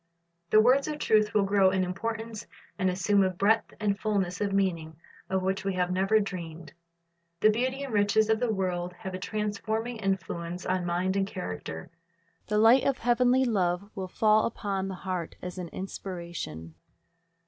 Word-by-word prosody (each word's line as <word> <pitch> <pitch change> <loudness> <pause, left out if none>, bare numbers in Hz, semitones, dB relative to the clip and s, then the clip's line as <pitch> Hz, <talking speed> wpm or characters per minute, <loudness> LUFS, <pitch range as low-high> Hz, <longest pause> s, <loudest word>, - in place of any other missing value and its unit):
The 215 - +6
words 255 +5 +4
of 300 -1 -3
truth 215 -7 +2
will 210 - +4
grow 195 -1 +4
in 190 0 +1
importance, 225 +4 -4 0.3
and 185 0 +2
assume 195 +2 +2
a 190 - +2
breadth 200 +5 +1
and 200 -2 0
fulness 200 -3 -1
of 205 -1 0
meaning 170 -5 0 0.3
of 190 0 0
which 190 +1 -1
we 195 -1 -1
have 180 0 0
never 195 +4 +3
dreamed. 170 -6 -6 0.7
The 215 - +6
beauty 260 +5 -1
and 270 -4 -6
riches 210 +1 +3
of 220 0 +2
the 245 -2 +1
word 180 -3 -2
have 190 +1 -7
a 185 - -4
transforming 220 +3 -3
influence 180 -3 -3
on 185 -1 -1
mind 180 +2 0
and 195 0 +1
character. 90 - -6 0.6
The 210 - 0
light 225 +5 +6
of 275 -2 +1
heavenly 250 +2 +3
love 195 -3 0
will 190 -1 -5
fall 215 +3 +3
upon 200 -4 -3
the 190 - -5
heart 180 -2 -4
as 180 +1 -7
an 180 - -4
inspiration. 170 - -6
195 Hz, 170 wpm, -28 LUFS, 180-215 Hz, 0.7 s, The